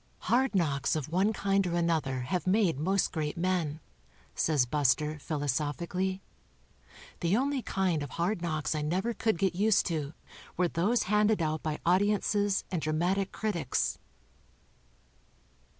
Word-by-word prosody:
"Hard 255 -1 +3
knocks 140 -6 +1
of 155 -2 -3
one 190 +6 +2
kind 195 -2 +1
or 170 - -1
another 160 -7 0
have 175 +9 -2
made 185 -7 +2
most 190 +5 +1
great 155 0 -3
men," 170 -4 -1 0.5
says 150 -5 +2
Bus 140 0 +3
ter, 150 0 -5
philosophic 145 +2 -2
ally. 190 +1 -1 1.0
"The 175 +4 +2
only 275 +1 0
kind 185 -8 0
of 145 - -5
hard 175 +5 -1
knocks 155 -5 -1
I 155 - -2
never 185 +10 -1
could 220 -3 0
get 190 0 +1
used 205 +3 +3
to 155 -3 -2 0.4
w'ere 180 0 +2
those 200 +10 +1
hand 210 +2 +3
ed 220 - +2
out 155 0 -1
by 155 -1 -2
audi 185 +4 +4
ences 205 -1 +1
and 175 -4 -1
dra 155 0 -1
matic 185 +5 0
critics." 175 - -1
175 Hz, 155 wpm, -30 LUFS, 155-195 Hz, 1.0 s, audi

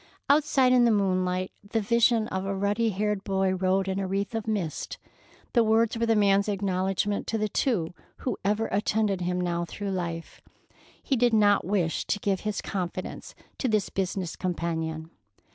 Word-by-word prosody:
Outside 280 -3 +4
in 250 -1 +5
the 235 - +5
moonlight, 185 -3 +1
the 205 +3 -1
vision 230 +1 +3
of 190 0 -2
a 195 0 -2
ruddy 205 +4 +1
haired 210 0 -1
boy 190 -1 +1
rode 190 +1 +1
in 190 0 -1
a 195 - -2
wreath 200 +3 -2
of 225 -1 -3
mist. 195 -8 -3 0.6
The 235 - +5
words 225 +1 +3
were 230 0 0
the 225 - +3
man's 200 0 +3
acknowledgment 195 0 -1
to 225 - 0
the 215 0 0
two 200 -7 0 0.2
who 255 - -2
ever 210 +3 +1
attended 205 -1 +1
him 180 +1 -1
now 175 -1 -1
through 200 +4 -5
life. 170 -3 -4 0.6
He 275 - +1
did 240 -2 +3
not 205 -3 +4
wish 180 -4 0
to - - 0
give 195 -2 0
his 210 -1 -3
confidence 185 -1 -5 0.2
to 265 - 0
this 215 -4 +1
business 185 -2 -2
companion. 160 -2 -3
200 Hz, 175 wpm, -27 LUFS, 185-220 Hz, 0.6 s, in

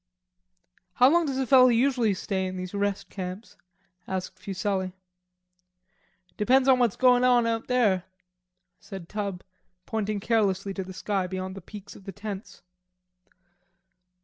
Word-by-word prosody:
"How 250 +7 +5
long 340 -1 +3
does 270 -2 -2
a 265 - 0
fellow 255 0 +7
usually 240 -3 +2
stay 190 0 -2
in 185 0 -5
these 185 +1 -6
rest 200 -1 -1
camps?" 185 +3 -7 0.5
asked 185 0 -4
Fuselli. 190 -1 -2 1.4
"Depends 255 +5 +3
on 260 -1 +5
what's 240 -5 +2
goin' 250 -1 +4
on 245 -2 +4
out 230 -1 -1
there," 215 -8 +2 0.7
said 190 -5 -9
Tub, 200 -3 -4 0.4
pointing 215 -2 -2
carelessly 200 -3 0
to 190 - -4
the 185 - -9
sky 190 0 -2
beyond 185 0 -5
the 195 - -9
peaks 200 +2 -11
of 195 - -15
the 195 - -6
tents. 205 0 -8
205 Hz, 140 wpm, -26 LUFS, 190-240 Hz, 1.4 s, fellow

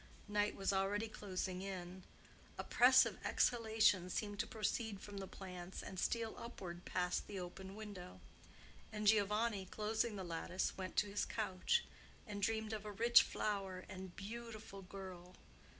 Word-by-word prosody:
Night 210 0 +1
was 195 0 +1
already 200 +3 +1
closing 185 -3 -3
in; 185 -1 -5 0.6
oppressive - - +6
exhalations 220 -6 +3
seemed 205 -2 -2
to - - +1
proceed 220 -2 -1
from 200 0 -7
the 195 - -5
plants 180 -1 -7
and 190 - -5
steal 230 +1 0
upward 180 -7 -7
past 180 0 0
the 200 - -4
open 190 +2 -7
window; 205 -4 -8 0.7
and 210 -1 -3
Giovanni, 210 -1 +3
closing 220 +2 0
the 190 - -4
lattice, 175 +2 -1
went 185 -2 -5
to 210 - +3
his 205 +1 0
couch 215 - +1 0.4
and 205 -3 -5
dreamed 220 +1 +1
of 215 -1 -3
a 210 - -5
rich 235 +4 +7
flower 195 -3 -2
and 185 -1 -7
beautiful 220 -1 -7
girl. 185 -2 -9
200 Hz, 145 wpm, -39 LUFS, 185-215 Hz, 0.7 s, rich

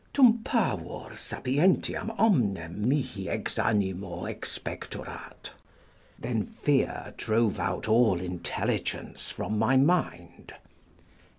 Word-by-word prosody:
"Tum 240 -4 +6
pavor 100 - -1
sapientiam 150 +11 +1
omnem 105 - +2
mihiex 125 -8 -1
animo 95 -4 -1
expectorat." - - -6 0.7
["Then - - -1
fear - - 0
drove 110 -1 +1
out - - -1
all 110 -5 +4
intelligence 90 -1 -3
from 105 0 -2
my 125 +5 +4
mind." 135 - 0
110 Hz, 85 wpm, -28 LUFS, 95-145 Hz, 0.7 s, Tum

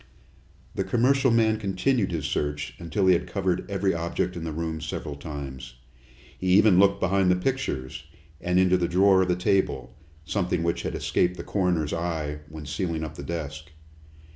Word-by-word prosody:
The - - -1
commercial 130 +3 +3
man 110 -2 +3
continued 100 +2 0
his 80 -4 -2
search 75 0 -2
until 95 +4 -1
he 95 - +6
had 85 - 0
covered 95 -2 -1
every 95 -1 +1
object 85 +2 -2
in 85 - -5
the 80 - -3
room 80 0 -3
several 75 - -5
times. 70 -4 -7 0.6
He 95 - -3
even 105 -4 +6
looked 100 0 +4
behind 95 0 +2
the 90 - +5
pictures, 90 - -3 0.4
and 90 +1 +1
into 95 0 +4
the 85 -1 0
drawer 95 +2 +4
of 95 - +1
the 90 - +2
table, 95 +2 0 0.3
something 90 -1 -1
which 85 0 0
had - - -4
escaped 90 0 0
the - - -6
coroner's 90 -6 0
eye 80 -3 -2
when 80 -1 -9
sealing 80 +1 -2
up 80 -1 -5
the 75 - -8
desk. 75 0 -5
90 Hz, 175 wpm, -26 LUFS, 80-95 Hz, 0.6 s, he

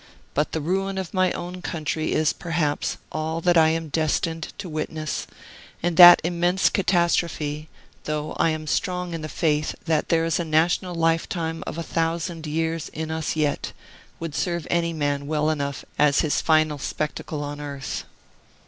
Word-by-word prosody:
But 150 +2 0
the 160 - -2
ruin 190 +4 -1
of 190 -3 -4
my 185 -1 +3
own 180 +1 -6
country 155 -1 -2
is, 155 -1 +2
perhaps, 160 -3 -1
all 160 +1 -2
that 175 +1 +3
I 160 -1 +6
am 165 -1 -2
destined 160 +2 -1
to 195 - -6
witness; 155 -1 -3 0.6
and 175 -1 +1
that 175 +1 +11
immense 175 +2 +2
catastrophe 170 -5 0 0.4
(though 150 0 -2
I - - +4
am 155 -1 -3
strong 180 +3 -1
in 165 - -4
the 155 - -5
faith 150 -2 0
that 160 -2 +1
there 165 -1 +3
is 165 - 0
a - - 0
national 170 +3 +1
lifetime 165 0 0
of - - -5
a 170 - -3
thousand 165 0 -2
years 160 +1 -2
in 160 0 -5
us 160 0 -2
yet) 150 -2 -1 0.5
would 165 -2 -5
serve 170 0 -1
any 170 -1 +1
man 145 -3 -1
well 155 0 +1
enough 140 -2 -3
as 145 -2 +4
his 155 - +1
final 155 -2 +2
spectacle 150 +1 -3
on 145 0 -5
earth. 140 -2 -5
160 Hz, 165 wpm, -24 LUFS, 155-170 Hz, 0.6 s, that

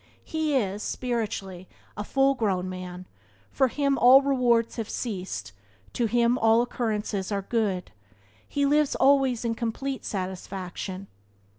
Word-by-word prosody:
He 315 -2 -1
is, 205 -5 0
spiritually, 205 -8 -3 0.3
a 210 - -4
full 270 +5 +2
grown 195 -7 -1
man; 185 0 -7 0.5
for 265 - +3
him 280 +1 0
all 260 +3 +8
rewards 245 -4 +2
have 225 -2 -4
ceased; 190 - -4 0.4
to 235 - +1
him 240 +2 +2
all 225 +1 +4
occurrences 215 -5 -2
are 200 -1 -1
good; 200 -5 -1 0.6
he 285 0 0
lives 295 0 +2
always 265 -3 +3
in 230 - +1
complete 250 +4 -3
satisfaction. 190 0 -5
230 Hz, 130 wpm, -26 LUFS, 195-260 Hz, 0.6 s, all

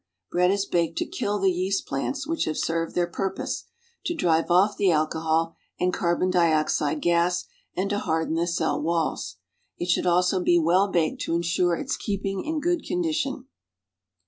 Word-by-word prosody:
Bread 180 +1 +3
is 200 +1 +1
baked 165 -3 0
to - - 0
kill 205 0 -2
the 195 -1 +3
yeast 185 +2 -1
plants, 265 - -3
which 330 +2 -1
have 155 - -2
served 165 0 -1
their 175 - +2
purpose, 190 +2 -3 0.4
to 345 - -1
drive 165 - +1
off 195 +4 +4
the 195 - +2
alcohol 160 +1 +1 0.3
and 180 0 +1
carlion 175 +1 +1
dioxide 155 -3 +2
gas, 175 +1 +2 0.3
and 190 +2 0
to 205 - 0
harden 160 -4 -1
the 170 +1 0
cell 170 -2 0
walls. 160 -10 -1 0.4
It 175 - -4
should 180 - +2
also 180 +1 +3
l^e 175 -1 +4
well 180 +5 +3
baked 170 -5 0
to 165 - -1
insure 170 +1 +1
its - - -3
keeping 195 -2 -3
in 315 0 -2
good 350 +2 0
condition. 315 -7 -1
175 Hz, 170 wpm, -25 LUFS, 165-195 Hz, 0.4 s, off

